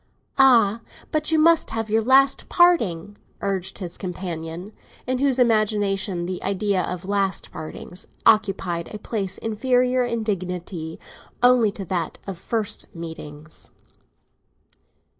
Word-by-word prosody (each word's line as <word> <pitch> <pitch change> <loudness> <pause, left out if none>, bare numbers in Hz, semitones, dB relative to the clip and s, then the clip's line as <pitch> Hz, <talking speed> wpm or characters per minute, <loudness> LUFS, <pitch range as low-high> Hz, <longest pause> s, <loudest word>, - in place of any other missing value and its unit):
"Ah, 230 -5 +5 0.3
but 305 +1 +1
you 320 - +4
must 330 +1 +4
have 225 -1 -3
your 220 +1 +2
last 270 +4 +4
parting!" 205 - +3 0.2
urged 190 -1 -2
his 180 -3 -6
companion, 175 0 -5 0.3
in 255 0 -1
whose 270 -2 +2
imagination 205 -6 +1
the 180 0 -4
idea 195 0 0
of 180 +1 -5
last 200 -1 -1
partings 175 +3 -8 0.2
occupied 195 -5 +2
a 210 - -5
place 205 -3 -3
inferior 250 +3 +1
in 235 -2 -2
dignity 180 -5 -4 0.4
only 245 -4 +5
to 200 -1 -6
that 170 -2 -2
of 195 -4 -6
first 220 0 -2
meetings. 155 -2 -8
205 Hz, 120 wpm, -23 LUFS, 180-235 Hz, 0.4 s, Ah